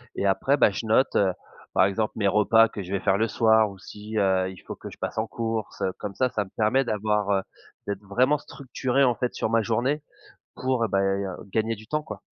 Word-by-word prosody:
et -, -, -1 dB
après 120 Hz, +8 st, +2 dB
ben, 120 Hz, -, +5 dB
je 100 Hz, -, -5 dB
note, 115 Hz, +5 st, +3 dB
heu, 95 Hz, -2 st, +3 dB, 0.4 s
par 95 Hz, -, +5 dB
exemple 105 Hz, +3 st, -1 dB
mes 105 Hz, -2 st, +1 dB
repas 105 Hz, +3 st, +5 dB
que 100 Hz, -, -6 dB
je 90 Hz, -, -9 dB
vais 100 Hz, -, 0 dB
faire 100 Hz, -1 st, +2 dB
le 110 Hz, +2 st, +1 dB
soir 110 Hz, -1 st, +4 dB
ou 100 Hz, -, -11 dB
si, 105 Hz, +3 st, -8 dB
heu, 95 Hz, -2 st, +2 dB
il 95 Hz, -, -10 dB
faut -, -, -6 dB
que -, -, -9 dB
je -, -, -13 dB
passe -, -, -5 dB
en 110 Hz, -, -1 dB
courses, 115 Hz, -2 st, -4 dB
heu. 95 Hz, -, +1 dB
Comme 100 Hz, -1 st, -5 dB
ça, 130 Hz, +4 st, +1 dB
ça 105 Hz, -4 st, -2 dB
me -, -, -16 dB
permet 110 Hz, +5 st, +3 dB
d'avoir, 105 Hz, -2 st, 0 dB
heu 100 Hz, -1 st, +2 dB, 0.5 s
d'être 100 Hz, -1 st, -3 dB
vraiment 125 Hz, +9 st, +2 dB
structuré 130 Hz, 0 st, -1 dB
en 125 Hz, -2 st, +4 dB
fait 125 Hz, +2 st, -2 dB
sur -, -, -1 dB
ma 115 Hz, 0 st, +3 dB
journée 120 Hz, +7 st, 0 dB, 0.5 s
pour, 130 Hz, -2 st, 0 dB
heu, -, -, +2 dB
beh, 95 Hz, -, +2 dB
heu, 95 Hz, 0 st, 0 dB, 0.2 s
gagner 110 Hz, +1 st, +1 dB
du 110 Hz, +1 st, -14 dB
temps 150 Hz, +4 st, -1 dB
quoi. 105 Hz, -8 st, -8 dB
110 Hz, 245 wpm, -25 LUFS, 100-120 Hz, 0.5 s, ben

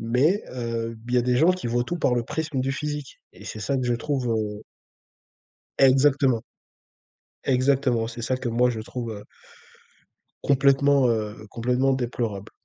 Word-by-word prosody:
Mais, 130 Hz, -, +2 dB
heu, 115 Hz, -2 st, -3 dB
il 125 Hz, -, -1 dB
y -, -, +5 dB
a -, -, +2 dB
des 125 Hz, 0 st, +1 dB
gens 160 Hz, +7 st, +5 dB
qui 185 Hz, -9 st, -5 dB
voient 120 Hz, +1 st, 0 dB
tout 175 Hz, -, -3 dB
par 125 Hz, -, +2 dB
le 120 Hz, -, 0 dB
prisme 155 Hz, -2 st, -3 dB
du 135 Hz, +1 st, -1 dB
physique. 150 Hz, 0 st, -5 dB
Et -, -, -14 dB
c'est 110 Hz, -, -7 dB
ça 140 Hz, +5 st, -1 dB
que 130 Hz, -, -1 dB
je 120 Hz, -, +1 dB
trouve, 130 Hz, 0 st, -2 dB
heu 105 Hz, -1 st, -2 dB, 1.2 s
Exactement. 135 Hz, -2 st, +4 dB, 1.0 s
Exactement, 130 Hz, -3 st, +2 dB
c'est 120 Hz, 0 st, -7 dB
ça 130 Hz, +3 st, 0 dB
que 130 Hz, -1 st, -4 dB
moi 120 Hz, +2 st, +3 dB
je 115 Hz, -3 st, -2 dB
trouve, 115 Hz, +1 st, -5 dB
heu 105 Hz, -1 st, -9 dB, 1.2 s
complètement, 140 Hz, -1 st, +4 dB
heu, 110 Hz, -2 st, -2 dB
complètement 125 Hz, +3 st, +1 dB
déplorable. 115 Hz, -5 st, -3 dB
125 Hz, 165 wpm, -25 LUFS, 115-135 Hz, 1.2 s, y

